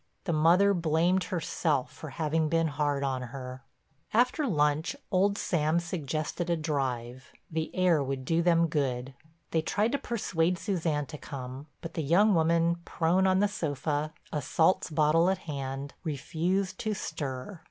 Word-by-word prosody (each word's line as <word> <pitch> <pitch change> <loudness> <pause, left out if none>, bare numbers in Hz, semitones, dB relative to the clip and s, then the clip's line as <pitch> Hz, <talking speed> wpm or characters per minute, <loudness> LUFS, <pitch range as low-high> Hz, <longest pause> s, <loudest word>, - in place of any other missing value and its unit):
The 170 - -1
mother 175 +6 +5
blamed 170 +2 +2
herself 160 -6 -1
for 155 - -8
having 155 +1 0
been 165 0 +2
hard 145 -1 0
on 130 -2 -1
her. 130 +1 -7 0.5
After 250 +5 +3
lunch 150 - +1 0.2
old 200 +1 +3
Sam 160 -1 +1
suggested 165 0 -3
a 170 - +2
drive—the 135 +1 -4
air 180 -5 +3
would 135 -1 -4
do 165 +4 +2
them 170 -1 +4
good. 135 -5 -1 0.4
They 160 - +2
tried 210 +7 0
to 280 - 0
persuade 180 -6 0
Suzanne 165 -7 -1
to 150 0 -9
come, 130 +1 -7
but 165 - -7
the 160 - -2
young 185 +8 +4
woman, 170 0 +3
prone 175 +3 +2
on 190 +1 +3
the 205 - +4
sofa, 150 -4 -2 0.2
a 150 - 0
salts 165 +6 +2
bottle 160 +3 +3
at 190 - +1
hand, 140 -3 -5
refused 175 +5 -1
to 215 -1 -1
stir. 145 -2 -5
160 Hz, 155 wpm, -29 LUFS, 145-180 Hz, 0.5 s, mother